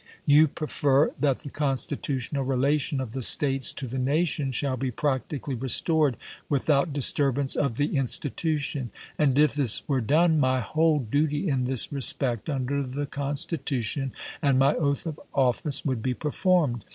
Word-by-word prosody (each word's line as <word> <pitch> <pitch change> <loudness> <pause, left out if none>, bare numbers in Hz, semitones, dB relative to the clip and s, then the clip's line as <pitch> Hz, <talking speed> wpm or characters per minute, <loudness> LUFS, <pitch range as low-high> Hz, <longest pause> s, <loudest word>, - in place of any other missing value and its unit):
You 150 +1 +5
prefer 145 -1 0
that 140 -2 0
the 145 -3 -9
constitutional 140 -1 -2
relation 135 +2 0
of 130 -4 -5
the 130 - -5
States 135 +1 +5
to 140 - -5
the 130 +1 -5
nation 140 +1 0
shall 130 +1 -1
be 130 +1 -3
practically 135 +2 -3
restored 135 +2 0 0.3
without 145 +2 +1
dis 140 -2 +3
turbance 140 -1 +1
of 135 -5 -1
the 145 +1 -1
institution; 140 0 -1 0.3
and 140 -3 +2
if 150 0 +4
this 135 -7 0
were 135 -3 0
done, 160 +6 +2
my 130 -2 +2
whole 155 +7 +1
duty 145 - -1
in 135 -5 0
this 130 -2 +3
respect, 125 -2 +2
under 140 0 -2
the 140 +2 -4
Constitution 140 -2 -3 0.3
and 140 -2 +2
my 135 +2 +3
oath 140 -1 -1
of 160 -3 -6 0.2
office, 135 +2 0
would 130 -5 -1
be 125 +1 -2
performed. 150 - 0
140 Hz, 155 wpm, -25 LUFS, 130-150 Hz, 0.3 s, You